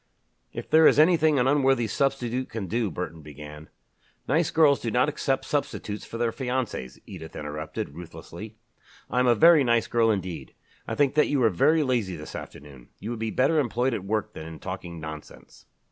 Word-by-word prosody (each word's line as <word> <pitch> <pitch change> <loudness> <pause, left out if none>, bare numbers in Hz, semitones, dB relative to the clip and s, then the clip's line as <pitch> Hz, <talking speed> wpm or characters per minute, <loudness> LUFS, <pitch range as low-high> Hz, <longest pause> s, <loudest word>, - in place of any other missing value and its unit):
"If - - -7
there 160 0 +6
is - - +4
anything 155 -1 +4
an 125 - +2
unworthy 135 -3 +3
substitute 130 +1 -1
can 110 -3 -5
do," 110 +3 -1
Burton 80 -1 -6
began, 75 +1 -11 0.6
"Nice 160 +4 +2
girls 150 -4 +4
do 115 - -3
not 125 +4 +2
accept 140 -2 -1
substitutes 140 -7 -3
for 115 - -7
their 115 -1 0
fiancés," 125 - -3
Edith 80 -4 -10
interrupted, 75 +1 -5
ruthlessly. 85 +6 -10 0.5
"I 125 - +1
am 125 - +3
a 120 - +5
very 165 0 +6
nice 120 -2 +2
girl 115 -1 +2
indeed. 95 -5 -3 0.3
I - - -3
think 145 -2 +2
that 150 - +3
you 140 -3 +1
are 110 - +4
very 155 - +3
lazy 120 -9 -1
this 75 -1 -9
afternoon. 70 -4 -10
You 110 - -5
would 120 - -5
be 110 0 -2
better 140 +8 +2
employed 125 -1 0
at 100 - -3
work 105 +2 -2
than 80 - -8
in 80 -1 -9
talking 90 -2 -7
nonsense." 80 -1 -10
115 Hz, 190 wpm, -26 LUFS, 85-135 Hz, 0.6 s, there